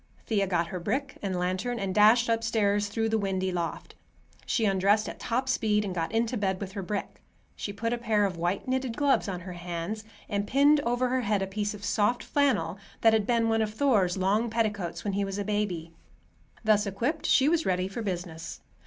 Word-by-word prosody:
Thea 200 Hz, -3 st, +1 dB
got 170 Hz, -2 st, 0 dB
her 180 Hz, -, -4 dB
brick 270 Hz, +10 st, -3 dB
and 190 Hz, -3 st, -2 dB
lantern, 185 Hz, +7 st, -1 dB
and 195 Hz, -3 st, -2 dB
dashed 220 Hz, +4 st, +5 dB
upstairs 220 Hz, -3 st, +1 dB
through 225 Hz, +2 st, -1 dB
the 220 Hz, 0 st, +1 dB
windy 190 Hz, -2 st, -1 dB
loft. 170 Hz, -2 st, -4 dB, 0.5 s
She 225 Hz, -, +1 dB
undressed 200 Hz, +2 st, +3 dB
at -, -, -7 dB
top 255 Hz, +3 st, -1 dB
speed 210 Hz, -4 st, +1 dB
and 190 Hz, -, -3 dB
got 165 Hz, -2 st, -2 dB
into 230 Hz, +2 st, 0 dB
bed 190 Hz, -3 st, -1 dB
with 195 Hz, -2 st, -5 dB
her 195 Hz, -, -5 dB
brick. 200 Hz, +2 st, -4 dB, 0.3 s
She 205 Hz, -, -4 dB
put 230 Hz, +3 st, -2 dB
a 240 Hz, -, -2 dB
pair 215 Hz, -3 st, +2 dB
of 190 Hz, -2 st, -2 dB
white 175 Hz, +6 st, -2 dB
knitted 260 Hz, -2 st, -1 dB
gloves 285 Hz, -7 st, +2 dB
on 180 Hz, -2 st, -4 dB
her 180 Hz, +1 st, -7 dB
hands, 175 Hz, +4 st, -5 dB, 0.2 s
and 205 Hz, -1 st, -2 dB
pinned 285 Hz, +4 st, +5 dB
over 245 Hz, -1 st, 0 dB
her 255 Hz, 0 st, +1 dB
head 205 Hz, -3 st, 0 dB
a -, -, 0 dB
piece 205 Hz, +2 st, -3 dB
of 205 Hz, 0 st, -8 dB
soft 210 Hz, +4 st, +1 dB
flannel 280 Hz, -8 st, +1 dB, 0.2 s
that 225 Hz, -1 st, +6 dB
had 215 Hz, -2 st, +2 dB
been 230 Hz, -2 st, +2 dB
one 225 Hz, 0 st, +2 dB
of 215 Hz, -1 st, -2 dB
Thor's 210 Hz, -10 st, +2 dB
long 205 Hz, +5 st, +1 dB
petticoats 210 Hz, -6 st, -2 dB
when 205 Hz, -, -2 dB
he 200 Hz, +1 st, 0 dB
was 195 Hz, 0 st, -3 dB
a 205 Hz, -, -2 dB
baby. 185 Hz, -6 st, -2 dB, 0.7 s
Thus 215 Hz, -1 st, +3 dB
equipped, 245 Hz, -, -2 dB
she 270 Hz, -, +4 dB
was 325 Hz, 0 st, +2 dB
ready 185 Hz, 0 st, +1 dB
for 195 Hz, +5 st, -5 dB
business. 175 Hz, -5 st, -5 dB
210 Hz, 210 wpm, -28 LUFS, 190-230 Hz, 0.7 s, that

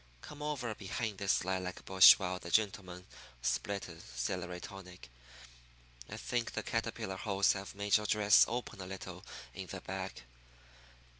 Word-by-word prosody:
Come 150 Hz, 0 st, -10 dB
over 140 Hz, -6 st, -2 dB
behind 105 Hz, +1 st, -4 dB
this 100 Hz, -2 st, +1 dB
lilac 95 Hz, -1 st, -3 dB
bush 95 Hz, -1 st, +10 dB
while 90 Hz, -1 st, -3 dB
the 85 Hz, -, -8 dB
gentlemen 95 Hz, -2 st, 0 dB, 0.4 s
split 100 Hz, +11 st, -1 dB
a 85 Hz, -2 st, -11 dB
celery 90 Hz, +8 st, -4 dB
tonic. 90 Hz, -9 st, -11 dB, 1.0 s
I -, -, -6 dB
think 120 Hz, -1 st, -2 dB
the -, -, -3 dB
caterpillar 95 Hz, 0 st, -3 dB
holes 100 Hz, 0 st, +2 dB
have 95 Hz, 0 st, -7 dB
made 100 Hz, +1 st, +3 dB
your 105 Hz, 0 st, -4 dB
dress 105 Hz, 0 st, +6 dB
open 120 Hz, -3 st, -4 dB
a 90 Hz, -, -7 dB
little 95 Hz, 0 st, -8 dB, 0.3 s
in -, -, -7 dB
the -, -, -6 dB
back." -, -, -6 dB
95 Hz, 150 wpm, -33 LUFS, 90-105 Hz, 1.0 s, bush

